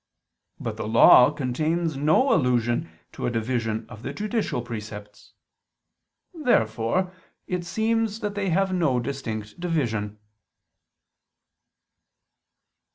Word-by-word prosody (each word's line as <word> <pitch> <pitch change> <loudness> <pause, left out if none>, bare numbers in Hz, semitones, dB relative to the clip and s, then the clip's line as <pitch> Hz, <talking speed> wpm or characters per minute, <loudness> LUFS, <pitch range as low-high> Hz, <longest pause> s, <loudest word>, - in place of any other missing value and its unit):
But - - -4
the - - -4
Law 120 +3 +7
contains 155 +4 -1
no 155 - +3
allusion 125 +1 +1 0.2
to - - -4
a - - +1
division 115 -1 -2
of 110 -3 -11
the - - -5
judicial 210 - -2
precepts. 105 -3 -9 1.0
Therefore 180 - +1 0.3
it 180 -1 -3
seems 220 +3 0
that 210 -2 -2
they 200 -2 -2
have 190 +2 +1
no 155 -9 +2
distinct 115 -4 -5
division. 115 - -2
135 Hz, 100 wpm, -25 LUFS, 115-185 Hz, 1.0 s, Law